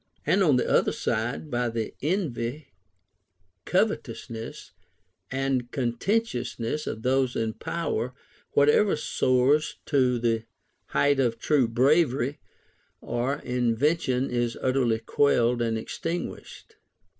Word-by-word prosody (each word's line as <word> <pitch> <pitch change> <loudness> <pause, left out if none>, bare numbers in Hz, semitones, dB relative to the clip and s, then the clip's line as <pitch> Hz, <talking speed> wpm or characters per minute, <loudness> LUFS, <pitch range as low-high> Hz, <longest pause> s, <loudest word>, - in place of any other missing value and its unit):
And 200 - +3
on 155 -8 +5
the 125 - +1
other - - +3
side, 120 +7 -2
by 120 0 0
the 115 -1 -3
envy, 150 - -2 1.0
covetousness, 130 - -2 0.6
and 130 -2 -1
contentiousness 125 - -1
of 110 - -4
those 130 0 +1
in 110 -1 -1
power, 130 -6 -3 0.4
whatever 150 +8 +4
soars 140 +1 +2
to 130 -3 +2
the 115 -1 0 0.4
height 145 -1 +2
of 120 -3 +1
true 135 +1 +2
bravery 135 +2 +2 0.6
or 120 +4 -2
invention 125 +2 +1
is 120 -1 -1
utterly 130 -3 +1
quelled 120 0 +2
and 115 -1 0
extinguished. 165 +9 -6
125 Hz, 105 wpm, -26 LUFS, 120-145 Hz, 1.0 s, on